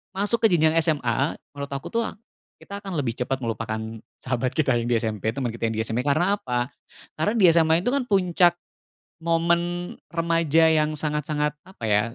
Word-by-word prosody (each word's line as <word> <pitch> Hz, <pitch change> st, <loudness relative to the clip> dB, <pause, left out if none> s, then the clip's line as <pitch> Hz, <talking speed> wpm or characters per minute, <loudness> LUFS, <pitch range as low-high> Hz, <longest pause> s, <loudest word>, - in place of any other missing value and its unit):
masuk 205 Hz, +4 st, +2 dB
ke -, -, +9 dB
jenjang 160 Hz, -2 st, +4 dB
SMA, 140 Hz, -3 st, +1 dB, 0.2 s
menurut 140 Hz, 0 st, -5 dB
aku, 135 Hz, -, -5 dB
tuh, 230 Hz, 0 st, +1 dB, 0.5 s
kita 200 Hz, 0 st, -7 dB
akan 195 Hz, -2 st, -6 dB
lebih 130 Hz, -5 st, -1 dB
cepat 130 Hz, +1 st, -2 dB
melupakan 115 Hz, -1 st, -3 dB, 0.4 s
sahabat 125 Hz, 0 st, -1 dB
kita 140 Hz, -5 st, +3 dB
yang 115 Hz, -, -3 dB
di 120 Hz, -, +3 dB
SMP, 110 Hz, -1 st, -2 dB
teman 130 Hz, -3 st, -2 dB
kita 115 Hz, 0 st, -2 dB
yang 110 Hz, -, -4 dB
di 110 Hz, -, 0 dB
SMP, 115 Hz, +2 st, -1 dB
karena 175 Hz, +8 st, +2 dB
apa? 125 Hz, -3 st, -2 dB, 0.5 s
Karena 160 Hz, +8 st, +1 dB
di 195 Hz, -, +5 dB
SMA 165 Hz, +1 st, +3 dB
itu, 245 Hz, -, +1 dB
kan, 275 Hz, -3 st, 0 dB
puncak 180 Hz, -3 st, +3 dB, 0.7 s
momen 170 Hz, +1 st, 0 dB, 0.2 s
remaja 165 Hz, -1 st, +3 dB
yang 155 Hz, -1 st, +2 dB
sangat-sangat 150 Hz, 0 st, -1 dB
apa, 190 Hz, -10 st, -15 dB
ya, 105 Hz, 0 st, +4 dB
155 Hz, 180 wpm, -24 LUFS, 125-175 Hz, 0.7 s, ke